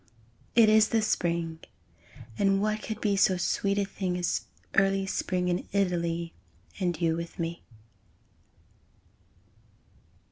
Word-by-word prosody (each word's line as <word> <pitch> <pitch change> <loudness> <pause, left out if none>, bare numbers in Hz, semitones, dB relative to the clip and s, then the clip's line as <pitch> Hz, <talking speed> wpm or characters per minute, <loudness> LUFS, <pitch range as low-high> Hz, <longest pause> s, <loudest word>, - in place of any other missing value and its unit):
It 230 -2 +7
is 215 0 +5
the 225 -2 +2
Spring! 170 -5 -1 0.8
And 195 - +2
what 215 +1 0
could 220 -1 -5
be 205 -2 +2
So 190 -1 +3
sweet 200 +3 0
a 200 - +2
thing 185 -2 -3
As 175 -1 -1 0.3
early 195 0 +3
Spring 180 -1 -1
In 175 0 -1
Italy, 170 -3 0 0.5
And 175 -4 -1
you 165 -2 +1
with 170 0 -6
me! 170 0 -4
185 Hz, 120 wpm, -28 LUFS, 170-200 Hz, 0.8 s, It